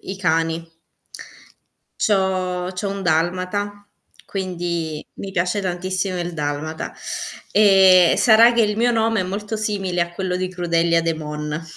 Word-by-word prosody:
i 190 - -7
cani. 165 -1 -1 1.2
C' - - +1
ho 185 -2 0
c'ho 190 +2 -3
un 200 0 -5
dalmata, 185 +5 -1 0.4
quindi 170 -5 -4
mi 195 - -7
piace 180 +2 0
tantissimo 185 0 -2
il 175 0 -3
dalmata. 150 +1 -4 0.6
Ehm, 190 -4 +6
sarà 230 0 +6
che 235 -1 +3
il 210 -1 0
mio 240 +2 +2
nome 225 -2 +1
è - - +1
molto 205 +4 -4
simile 195 -4 -2
a 170 0 0
quello 180 0 -2
di 185 0 -2
Crudelia 170 -2 +1
De 165 0 0
Mon. 150 0 -5
185 Hz, 145 wpm, -21 LUFS, 170-200 Hz, 1.2 s, Ehm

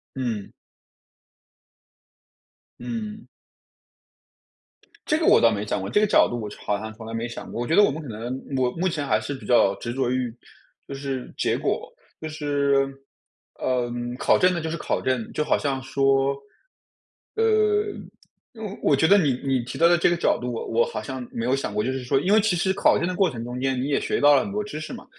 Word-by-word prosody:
嗯。 120 -6 -3 2.3
嗯。 220 -2 -6 1.8
这 305 - +2
个 320 - -1
我 - - +7
倒 115 - +5
没 105 -1 -2
想 100 - -2
过， 95 - -4
这 130 - +3
个 215 - +3
角 - - +5
度 120 - -3
我 105 -2 -5 0.2
好 100 -1 0
像 110 +1 -7
从 110 0 -11
来 115 - -7
没 115 +1 -2
想 115 - -8
过。 120 - -4
我 120 - -3
觉 165 - +2
得 205 - +7
我 - - +4
们 155 +4 -5
可 150 - -9
能 120 +3 -5 0.2
我 125 -1 +1
目 180 +7 -1
前 150 -4 -2
还 110 -5 +2
是 110 +6 -5
比 135 - -9
较 110 -5 +4
执 120 +4 -5
着 130 -2 0
于 125 -2 -1 0.5
就 140 - -6
是 135 -2 -5
结 - - +1
果。 - - -2 0.3
就 160 - -4
是 140 -3 +1 0.7
嗯， 120 -1 -2
考 - - +3
证 185 0 +4
的 170 - -2
就 160 0 -3
是 165 - -3
考 - - -2
证。 130 -3 -1
就 150 - 0
好 - - +2
像 135 -2 -2
说， 135 0 +2 1.0
呃 430 -2 +3 1.0
我 145 - +4
觉 160 +4 +3
得 200 - +7
你 150 -9 +3
你 135 -2 +1
提 120 - -7
到 170 - +5
的 175 - +5
这 170 - +3
个 - - +2
角 170 - +1
度 125 0 -4
我 115 - -4
我 115 +1 +2
好 - - -5
像 130 +1 -6
没 115 - -4
有 125 - +1
想 135 -6 -2
过。 105 0 0
就 130 - -1
是 130 0 -3
说 125 - +2
因 185 +6 0
为 215 - +6
其 210 -3 +2
实 180 +2 +1
考 200 - +3
证 - - -1
的 185 - -2
过 190 -1 +3
程 115 -2 -6
中 125 +1 -5
间 130 -1 0
你 135 - -2
也 145 - +2
学 - - -1
到 145 0 +7
了 - - +3
很 205 - -6
多 210 0 -1
知 205 -7 -6
识 155 - -7
嘛， 245 - -9
135 Hz, 240 characters per minute, -24 LUFS, 120-170 Hz, 2.3 s, 我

